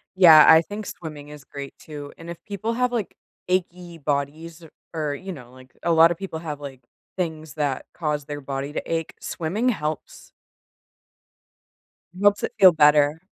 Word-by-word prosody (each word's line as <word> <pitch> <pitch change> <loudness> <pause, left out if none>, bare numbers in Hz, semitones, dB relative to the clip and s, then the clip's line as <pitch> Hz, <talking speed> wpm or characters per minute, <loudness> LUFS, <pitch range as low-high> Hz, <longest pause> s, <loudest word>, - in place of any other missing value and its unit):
Yeah, 165 -5 +9
I 160 0 +8
think 205 +4 -7
swimming 150 -3 -8
is 150 -2 -11
great 140 0 -9
too, 145 -2 -9
and 165 +1 -11
if 170 - -6
people 215 +3 -3
have, 250 +1 0
like, 230 -5 -3 0.3
achy 180 -2 -2
bodies 155 +3 -3
or 160 - -13 0.2
or, 155 -3 -2
you 190 +7 -7
know, 125 -8 -11
like, 130 0 -16
a 170 - +1
lot 165 0 +7
of 175 - -3
people 190 -4 -6
have, 150 -3 -6
like, 135 -3 -9 0.3
things 160 -4 -4
that 145 -4 -2
cause 150 -3 -2
their 145 0 -6
body 135 +1 -5
to - - -2
ache 165 -1 -2
swimming 200 +10 -2
helps 155 -9 -5 1.9
helps 205 0 +3
it - - -2
feel 190 -2 +9
better. 150 0 +4
160 Hz, 170 wpm, -23 LUFS, 145-175 Hz, 1.9 s, Yeah